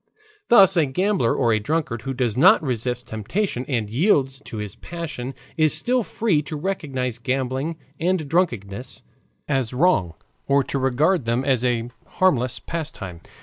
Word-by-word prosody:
Thus 195 -5 +7
a 155 -4 +4
gambler 180 - +1
or 120 -4 +2
a 110 - +2
drunkard 120 -1 -2
who 135 +1 -4
does 120 -4 0
not 135 - +6
resist 125 -2 -2
temptation 125 - -2
and 115 -6 -1
yields 135 - +2
to 110 - -7
his 105 -2 -5
passion 145 -7 -6 0.2
is 155 -1 +4
still 250 +1 +1
free 210 -7 0
to 150 +1 -6
recognize 140 - -3
gambling 130 +4 -2 0.2
and 175 -2 0
drunkenness 125 - -2 0.4
as 135 -4 -1
wrong 125 - +2 0.3
or 140 0 +3
to 140 - -3
regard 135 +5 +2
them 120 +3 0
as 130 -4 +2
a 120 -1 0 0.2
harmless 130 -10 +2
pastime. 110 - -6
135 Hz, 150 wpm, -23 LUFS, 120-165 Hz, 0.4 s, Thus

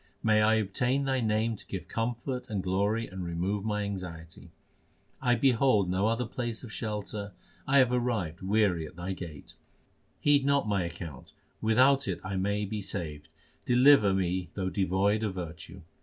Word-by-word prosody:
May 110 -1 +4
I 110 +1 +4
obtain 125 +6 0
Thy 135 -1 +1
name 110 +1 +1
to - - -14
give 95 - -6
comfort 120 +3 -3
and 100 -3 -2
glory 100 +5 0
and 95 -3 -7
remove 90 +4 -2
my 105 -1 -1
anxiety. 85 -5 -7 0.7
1 125 -2 +2
behold 120 -7 +3
no 95 +3 +1
other 115 +2 0
place 120 0 -4
of 115 -4 -9
shelter; 105 -2 -4 0.3
I 140 - +4
have 130 -2 +5
arrived 115 -9 -1
weary 95 -5 +1
at - - -14
Thy 90 +2 -4
gate. 85 -6 -9 0.7
Heed 145 -1 +4
not 140 -3 +2
my 100 -4 +1
account; 85 -5 -8 0.3
without 130 +5 +4
it - - -2 0.2
may 100 +2 0
I - - -1
be 105 +1 -4
saved! 80 -6 -5 0.4
deliver 125 -4 +6
me 90 -2 -1
though 95 -1 -2
devoid 100 +3 +1
of 105 -4 -2
virtue. 90 +2 -7
105 Hz, 165 wpm, -29 LUFS, 95-115 Hz, 0.7 s, deliver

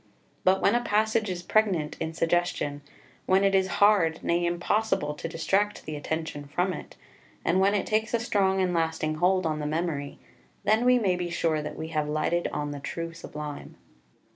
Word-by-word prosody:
But 190 +1 +3
when - - +4
a 240 - +2
passage 220 0 +1
is 180 -1 -4
pregnant 185 -8 +1
in 160 0 -3
suggestion, 165 -4 0 0.5
when 190 +1 +4
it 195 0 +3
is 190 -1 +3
hard, 190 -6 +4
nay 175 0 +1
impossible, 175 -2 0
to 150 - -6
distract 195 +6 0
the 155 - -5
attention 150 -1 -4
from 180 +6 0
it, - - -9 0.5
and 175 +3 +3
when 200 +2 +3
it 200 - 0
takes 220 +2 0
a - - +1
strong 195 -4 +1
and 180 -1 +1
lasting 160 -2 0
hold 185 +2 +2
on 155 -1 -1
the 150 - -2
memory, 155 -3 -2 0.5
then 215 +4 +3
we 250 0 +6
may 195 -6 +2
be 180 -1 -3
sure 160 -2 0
that 150 - -6
we 160 0 -5
have 155 -2 -1
lighted 170 +3 0
on 145 0 -3
the 145 - -6
true 165 +4 -5
Sublime. 150 -3 -8
175 Hz, 190 wpm, -27 LUFS, 155-195 Hz, 0.5 s, we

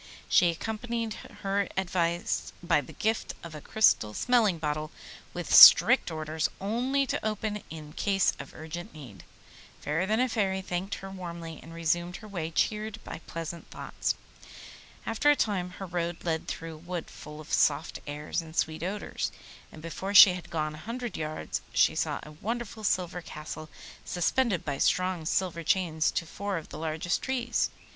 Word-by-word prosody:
She 175 - +5
accompanied 225 +5 -3 0.3
her 195 0 +1
advice 175 -2 0
by 170 - +3
the 130 - -12
gift 220 +1 -1
of 170 -2 -8
a 150 - -8
crystal 110 - +3
smelling 230 -8 +3
bottle, 155 0 -2 0.4
with - - -4
strict - - +10
orders 155 0 -2
only 250 +7 0
to - - -2
open 215 0 -1
it - - -14
in 155 -2 -9
case 195 -2 +2
of 140 - -9
urgent 160 +1 -7
need. 130 -10 -11 0.6
Fairer 165 +6 -1
than 220 +2 +2
a 255 - +3
Fairy 195 -5 0
thanked 185 +2 -3
her 195 0 -8
warmly, 170 -3 -7
and 165 - -12
resumed 170 +2 0
her 215 - -9
way 175 -6 -4
cheered 215 +6 -1
by - - -7
pleasant 165 +1 -6
thoughts. - - -3 0.9
After 225 +6 +2
a 295 - +7
time 195 -8 0
her 195 - -7
road 170 -1 -3
led 160 -2 -1
through 165 0 -5
a - - -10
wood, 175 +1 -5
full 150 0 -10
of 155 - -8
soft - - +2
airs 150 +3 -3
and 160 -1 -12
sweet 160 -1 0
odours, 195 +4 -3 0.4
and 155 - -12
before 190 +4 -4
she 195 -2 +11
had 180 -1 -8
gone 155 -2 -2
a - - -9
hundred 235 +5 -5
yards 155 0 -3
she - - +4
saw - - -1
a 150 - -10
wonderful 220 +6 -5
silver 180 -3 0
Castle 155 -1 -8 0.3
suspended 185 +2 +1
by 140 -2 -2
strong 180 -3 +1
silver 180 -2 0
chains 160 -2 +2
to 165 - -2
four 200 +3 -3
of 160 - -7
the 150 - -8
largest 160 +2 -1
trees. 245 -2 0
175 Hz, 170 wpm, -29 LUFS, 160-205 Hz, 0.9 s, she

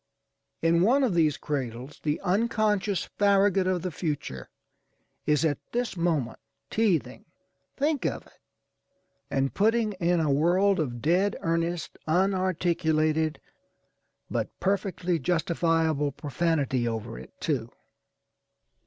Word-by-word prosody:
In 170 +1 +4
one 255 +9 +4
of 240 -7 +2
these 155 -4 +2
cradles 130 -1 -4
the 150 0 -1
unconscious 210 0 +1 0.2
Farragut 200 -2 +4
of 180 -2 0
the 185 - -2
future 145 - -4 0.8
is 150 +2 +3
at 145 -3 0
this 240 -3 -1
moment 160 -9 -1 0.3
teethingâ€"think 235 - -2
of - - -4
it! - - -23 0.9
and 135 0 0
putting 220 +1 +2
in 175 -2 +1
a 155 -3 +1
world 180 +7 +3
of 120 -6 -3
dead 185 +6 +2
earnest, 165 +1 -2
unarticulated, 160 -4 +1 0.9
but - - -2
perfectly 185 -3 0
justifiable 165 -1 +1
profanity 140 -3 0
over 115 0 -4
it, - - -14
too. 130 -8 -1
170 Hz, 110 wpm, -27 LUFS, 150-195 Hz, 0.9 s, In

